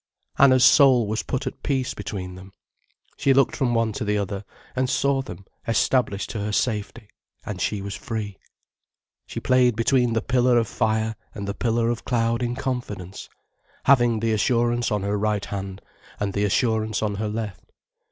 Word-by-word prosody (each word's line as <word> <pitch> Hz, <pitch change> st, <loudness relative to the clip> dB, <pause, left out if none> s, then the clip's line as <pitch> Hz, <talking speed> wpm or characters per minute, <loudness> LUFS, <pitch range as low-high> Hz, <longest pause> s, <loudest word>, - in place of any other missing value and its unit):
Anna's 130 Hz, -2 st, +6 dB
soul 130 Hz, -5 st, +6 dB
was 110 Hz, +2 st, -1 dB
put 130 Hz, +1 st, -3 dB
at 130 Hz, -, -6 dB
peace 135 Hz, -3 st, -1 dB
between 90 Hz, -3 st, -6 dB
them. 95 Hz, +1 st, -12 dB, 0.6 s
She 135 Hz, -1 st, +3 dB
looked 135 Hz, -2 st, +3 dB
from 120 Hz, -3 st, 0 dB
one 115 Hz, -1 st, +1 dB
to -, -, -3 dB
the 105 Hz, 0 st, 0 dB
other, 100 Hz, 0 st, -3 dB, 0.3 s
and 130 Hz, 0 st, 0 dB
she -, -, +1 dB
saw 140 Hz, -1 st, +1 dB
them 95 Hz, -7 st, -10 dB, 0.2 s
established 115 Hz, -3 st, +1 dB
to 110 Hz, -, -4 dB
her 105 Hz, +1 st, -2 dB
safety, 105 Hz, 0 st, -2 dB, 0.4 s
and 95 Hz, -3 st, -5 dB
she 100 Hz, +1 st, -1 dB
was 100 Hz, 0 st, -5 dB
free. 105 Hz, -4 st, -5 dB, 0.9 s
She -, -, -5 dB
played 125 Hz, -2 st, +3 dB
between 120 Hz, +1 st, +2 dB
the 115 Hz, -, 0 dB
pillar 125 Hz, -1 st, +3 dB
of 115 Hz, -2 st, +2 dB
fire 110 Hz, +1 st, 0 dB, 0.2 s
and 100 Hz, -2 st, -5 dB
the 100 Hz, -, -2 dB
pillar 115 Hz, +2 st, 0 dB
of 120 Hz, -, -4 dB
cloud 115 Hz, -1 st, 0 dB
in 120 Hz, 0 st, -1 dB
confidence, 115 Hz, -8 st, -5 dB, 0.5 s
having 120 Hz, -5 st, +4 dB
the 115 Hz, -1 st, +1 dB
assurance 120 Hz, +2 st, +1 dB
on 105 Hz, -2 st, 0 dB
her 100 Hz, +1 st, -1 dB
right 105 Hz, -1 st, 0 dB
hand 95 Hz, -1 st, -6 dB, 0.4 s
and 100 Hz, -1 st, -2 dB
the 100 Hz, 0 st, +1 dB
assurance 110 Hz, 0 st, 0 dB
on 105 Hz, -1 st, 0 dB
her 105 Hz, 0 st, -2 dB
left. 105 Hz, -2 st, -6 dB
110 Hz, 180 wpm, -24 LUFS, 105-125 Hz, 0.9 s, Anna's